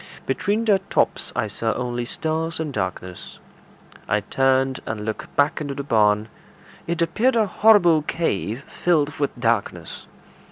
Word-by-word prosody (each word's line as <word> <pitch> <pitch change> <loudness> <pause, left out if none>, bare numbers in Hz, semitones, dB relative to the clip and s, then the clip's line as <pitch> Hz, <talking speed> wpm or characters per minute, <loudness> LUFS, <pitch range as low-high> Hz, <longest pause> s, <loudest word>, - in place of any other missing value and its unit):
Between 205 +11 0
their 205 -3 +4
tops - - 0
I 110 - 0
saw 110 +2 -1
only 120 -1 -3
stars 160 +5 -2
and 155 -3 -3
darkness. 95 -3 -5 0.7
I 105 - +1
turned 135 +2 +1
and 105 -1 -4
looked 110 0 -5
back 145 +2 +2
into 140 -2 -4
the 140 - -4
barn. 105 -4 +2 0.6
It 170 0 0
appeared 230 +10 +1
a 225 -2 +3
horrible 195 -6 +5
cave 135 - -2
filled 150 -5 0
with 140 -3 -2
darkness. 115 -3 -2
140 Hz, 145 wpm, -22 LUFS, 110-165 Hz, 0.7 s, horrible